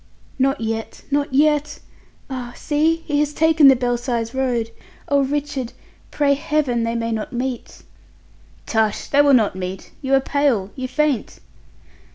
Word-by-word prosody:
"Not 270 Hz, +2 st, +2 dB
yet, 225 Hz, 0 st, -4 dB
not 285 Hz, 0 st, 0 dB
yet! 295 Hz, +2 st, +2 dB, 0.5 s
Ah! 250 Hz, -2 st, -6 dB
see 320 Hz, +2 st, 0 dB
he 295 Hz, -2 st, 0 dB
has 295 Hz, 0 st, 0 dB
taken 320 Hz, -2 st, +5 dB
the 270 Hz, -, +8 dB
Belsize 240 Hz, -1 st, -2 dB
Road. 245 Hz, -4 st, -1 dB, 0.4 s
Oh, 280 Hz, -1 st, +3 dB
Richard, 275 Hz, -3 st, -3 dB, 0.4 s
pray 285 Hz, -1 st, +2 dB
Heaven 285 Hz, -4 st, 0 dB
they 230 Hz, 0 st, -1 dB
may 230 Hz, 0 st, -2 dB
not 220 Hz, -1 st, -3 dB
meet." 250 Hz, 0 st, -4 dB, 0.8 s
"Tush! 220 Hz, -2 st, 0 dB
They 285 Hz, -, +4 dB
will 285 Hz, -2 st, +5 dB
not 215 Hz, -6 st, +2 dB
meet! 185 Hz, 0 st, -6 dB
You 270 Hz, 0 st, +2 dB
are -, -, +5 dB
pale, 265 Hz, -8 st, 0 dB
you 260 Hz, -1 st, -4 dB
faint!" 290 Hz, -3 st, -1 dB
265 Hz, 150 wpm, -21 LUFS, 235-290 Hz, 0.8 s, the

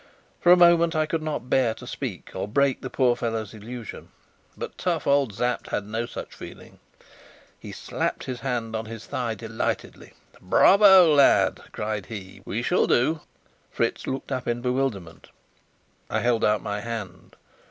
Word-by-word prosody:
For 175 Hz, -, +4 dB
a 180 Hz, -, +8 dB
moment 170 Hz, -1 st, +5 dB
I 155 Hz, 0 st, +2 dB
could 160 Hz, +1 st, -2 dB
not 150 Hz, -6 st, -4 dB
bear 125 Hz, -3 st, +2 dB
to -, -, -11 dB
speak -, -, -6 dB
or -, -, -4 dB
break 140 Hz, +4 st, +1 dB
the 130 Hz, -, -5 dB
poor 125 Hz, -2 st, +2 dB
fellow's 115 Hz, -3 st, -3 dB
illusion. 115 Hz, +1 st, -9 dB, 0.5 s
But -, -, -6 dB
tough 170 Hz, -3 st, -2 dB
old 140 Hz, -7 st, +2 dB
Sapt 125 Hz, +3 st, -1 dB
had 105 Hz, -, -3 dB
no 110 Hz, +3 st, -3 dB
such -, -, -8 dB
feeling. -, -, -12 dB, 0.8 s
He -, -, -9 dB
slapped -, -, -3 dB
his 125 Hz, -2 st, -5 dB
hand 115 Hz, -2 st, -3 dB
on 110 Hz, 0 st, -3 dB
his 115 Hz, 0 st, -9 dB
thigh 120 Hz, -3 st, -3 dB
delightedly. 115 Hz, 0 st, -4 dB, 0.3 s
"Bravo, 190 Hz, -, +6 dB
lad!" 140 Hz, -2 st, +4 dB
cried 105 Hz, -2 st, -4 dB
he. 95 Hz, -4 st, -9 dB
"We 115 Hz, +3 st, -3 dB
shall 180 Hz, -, +2 dB
do!" 155 Hz, +7 st, +2 dB, 0.5 s
Fritz -, -, -2 dB
looked 135 Hz, +1 st, -4 dB
up 130 Hz, -1 st, -3 dB
in 120 Hz, 0 st, -1 dB
bewilderment. 125 Hz, -10 st, -2 dB, 0.8 s
I -, -, -1 dB
held 120 Hz, -2 st, +1 dB
out 105 Hz, -2 st, +2 dB
my 105 Hz, 0 st, -3 dB
hand. 105 Hz, -5 st, -7 dB
120 Hz, 165 wpm, -25 LUFS, 110-140 Hz, 0.8 s, a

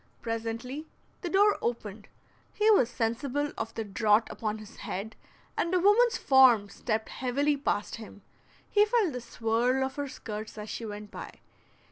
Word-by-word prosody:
Presently 230 Hz, +6 st, -4 dB, 0.3 s
the 355 Hz, -, -3 dB
door 405 Hz, +3 st, +4 dB
opened; 215 Hz, -3 st, -4 dB, 0.5 s
he 425 Hz, +1 st, +4 dB
was 255 Hz, -, +5 dB
sensible 255 Hz, +6 st, -1 dB
of 225 Hz, 0 st, -4 dB
the 225 Hz, -, -2 dB
draught 210 Hz, +2 st, +2 dB
upon 215 Hz, -1 st, -3 dB
his 215 Hz, -1 st, -12 dB
head, 215 Hz, +4 st, -5 dB, 0.4 s
and 340 Hz, -, 0 dB
a -, -, +4 dB
woman's 450 Hz, +6 st, +5 dB
form 250 Hz, -7 st, +5 dB
stepped 220 Hz, 0 st, -2 dB
heavily 280 Hz, +4 st, 0 dB
past 235 Hz, -8 st, -2 dB
him; 215 Hz, -3 st, -11 dB, 0.4 s
he 415 Hz, -, +4 dB
felt 425 Hz, -, +2 dB
the 250 Hz, -, -4 dB
"swirl" 240 Hz, +3 st, 0 dB
of 265 Hz, +1 st, -6 dB
her 285 Hz, 0 st, -2 dB
skirts 215 Hz, -4 st, -7 dB
as 210 Hz, 0 st, -6 dB
she 230 Hz, -, -5 dB
went 210 Hz, 0 st, -8 dB
by. -, -, -9 dB
235 Hz, 160 wpm, -29 LUFS, 220-290 Hz, 0.5 s, was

